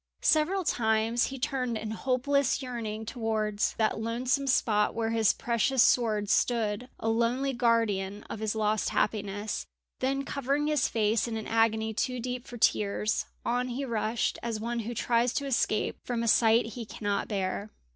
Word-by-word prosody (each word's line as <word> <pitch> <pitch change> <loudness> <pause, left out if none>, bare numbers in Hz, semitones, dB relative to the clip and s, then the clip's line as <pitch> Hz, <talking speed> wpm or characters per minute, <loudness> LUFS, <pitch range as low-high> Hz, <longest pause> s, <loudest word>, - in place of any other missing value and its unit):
Several 345 +5 +3
times 225 -3 +1
he 270 - -6
turned 255 -3 -1
in 215 0 -5
hopeless 265 +4 +1
yearning 220 -3 -4
towards 220 -3 -1
that 220 -1 0
lonesome 250 +5 -1
spot 210 -5 +2
where 225 0 -1
his 225 -2 +4
precious 235 +2 +2
sword 215 -4 +2
stood 230 +1 +1
a - - -3
lonely 235 +4 +1
guardian 210 -5 +1
of - - -7
his 220 0 -1
lost 215 -1 +1
happiness; 205 0 -2 0.3
then, 275 +1 0
covering 280 +2 -1
his 300 -3 +2
face 220 +1 +1
in 225 -1 -3
an 220 - -5
agony 220 -1 +1
too 250 +3 -1
deep 250 +1 -4
for 245 - -8
tears, 210 -1 +1 0.2
on 245 +1 0
he 255 +3 -3
rushed 225 -1 -1
as 230 -2 -3
one 235 +2 -2
who 230 +2 -4
tries 235 +2 +1
to 280 - -1
escape 235 -5 0
from 235 -2 -2
a - - -1
sight 225 +1 +5
he 240 - -5
cannot 205 -2 -3
bear. 200 0 -2
230 Hz, 165 wpm, -29 LUFS, 215-250 Hz, 0.3 s, sight